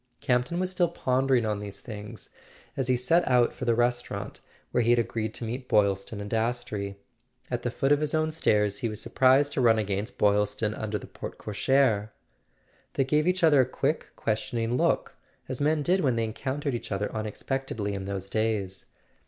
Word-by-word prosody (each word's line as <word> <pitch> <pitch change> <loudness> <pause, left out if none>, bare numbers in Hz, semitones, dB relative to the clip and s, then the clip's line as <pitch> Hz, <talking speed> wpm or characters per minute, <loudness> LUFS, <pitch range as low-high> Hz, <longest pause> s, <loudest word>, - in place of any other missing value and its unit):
Campton 125 +7 0
was 185 0 -1
still 175 -1 +2
pondering 130 -6 +1
on 105 -1 -1
these 100 -1 -7
things 105 -3 -9 0.4
as 130 - -1
he 130 -1 +3
set 145 +8 +3
out 125 -2 +4
for 125 - -5
the 120 -1 +3
restau¬ 120 +1 +1
rant 100 -1 -6 0.3
where 120 - +2
he 115 - +1
had 120 - +5
agreed 115 -1 -1
to - - -6
meet 125 +3 -4
Boylston 100 0 +1
and 100 - -5
Das 115 +3 0
trey. 100 -2 -5 0.6
At 120 -1 -1
the 120 - -1
foot 135 +3 0
of 145 - +5
his 150 0 0
own 155 0 +1
stairs 105 -10 +2
he 120 -4 -1
was 105 - -5
surprised 135 +2 +3
to 135 - 0
run 115 -2 +5
against 105 +2 -2
Boylston 105 +1 +2
under 110 -1 -3
the - - -9
porte - - -8
cochere. 110 -1 +1 0.9
They 135 - +3
gave 150 +4 +1
each 180 0 +1
other 150 -4 +6
a - - +2
quick 140 +4 -1
questioning 115 +2 -1
look, - - +1 0.3
as 130 - -4
men 150 +1 +2
did 180 +5 +2
when 130 -5 +2
they 115 - 0
encountered 130 +5 -3
each 120 - -5
other 100 +1 -2
unexpectedly 110 0 -3
in 95 -1 -4
those 95 -1 -4
days. 105 -3 -2
120 Hz, 195 wpm, -27 LUFS, 105-135 Hz, 0.9 s, other